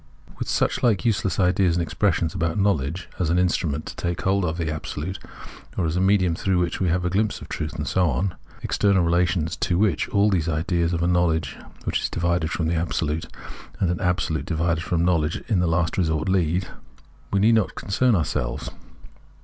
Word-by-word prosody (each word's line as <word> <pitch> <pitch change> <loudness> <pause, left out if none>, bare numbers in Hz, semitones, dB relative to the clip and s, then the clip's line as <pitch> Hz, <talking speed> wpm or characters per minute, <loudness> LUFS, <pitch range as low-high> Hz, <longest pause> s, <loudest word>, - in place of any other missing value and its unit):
With - - -3
suchlike 120 -2 +1
useless 100 -5 +1
ideas 90 -1 +3
and 85 - +1
expressions 85 0 0
about 85 -2 -1
knowledge, 90 -4 0
as 90 -4 +1
an 85 - +2
instrument 85 -4 0
to - - -7
take 85 0 -3
hold 95 0 +2
of 80 0 -2
the 80 -2 -1
Absolute, 80 +4 -5 0.6
or 90 - +1
as 80 +1 -1
a 90 - +1
medium 95 -3 +3
through 95 +2 0
which 90 -1 0
we 95 - +1
have 90 +1 0
a - - +1
ghmpse 105 +3 0
of - - -11
truth, 75 -1 -4
and - - -3
so 90 -2 +2
on 90 +7 -1 0.3
(external 100 -3 +2
relations 85 -1 +1
to 85 - 0
which 100 -5 +1
all 105 +1 +3
these 85 -4 +1
ideas 85 +1 0
of 85 0 -1
a - - +2
knowledge 80 -5 +1 0.3
which - - 0
is - - -1
divided 85 -1 0
from 85 - -2
the 85 - 0
Absolute 80 -1 -1 0.5
and 90 - +2
an 90 - -2
Absolute 90 -2 -1
divided 85 -1 0
from 85 -1 0
knowledge 80 -3 +1
m 105 -5 +2
the 90 - +2
last 85 +2 0
resort 80 -2 0
lead), 90 -1 +1 0.6
we 100 - +2
need 110 +4 +5
not 110 -7 +1
concern 120 +4 +1
ourselves. 65 -6 -2
85 Hz, 200 wpm, -24 LUFS, 80-95 Hz, 0.6 s, need